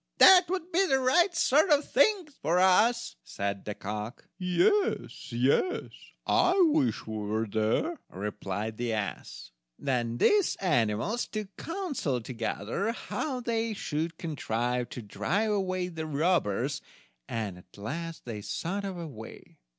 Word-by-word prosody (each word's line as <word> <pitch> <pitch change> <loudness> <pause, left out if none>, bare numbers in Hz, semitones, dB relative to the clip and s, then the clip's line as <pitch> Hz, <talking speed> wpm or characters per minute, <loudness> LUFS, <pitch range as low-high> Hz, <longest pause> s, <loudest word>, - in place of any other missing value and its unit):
"That 370 -1 +9
would 365 -1 -3
be 365 +4 +4
the 270 - +3
right 340 +8 +3
sort 310 +2 +4
of 295 -1 +4
thing 375 - +3
for 165 +4 +2
us," 215 +6 +3
said 100 0 -4
the 105 - -4
cock. 105 +4 -6
"Yes, 375 - +1
yes, 130 - +1 0.3
I 365 +2 +3
wish 295 -5 +1
we 110 0 -5
were 105 +2 -1
there," 110 - 0
replied 105 +2 -4
the 120 -1 -1
ass. 105 - -5 0.3
Then 120 -4 -1
these 410 - +3
animals 150 - 0
took 210 -3 -6
counsel 330 - -2
together 115 - -3
how 255 +1 -4
they 230 -2 -1
should 160 -2 -3
contrive 125 -5 -2
to 125 - -7
drive 170 - -1
away 185 -3 0
the 160 -3 -5
robbers, 145 - +1 0.5
and 105 -6 -3
at 90 - -19
last 165 +10 -5
they 110 -4 -5
thought 185 - -3
of 195 -2 -4
a 170 - -5
way. 110 -8 -11
165 Hz, 140 wpm, -29 LUFS, -, 0.5 s, That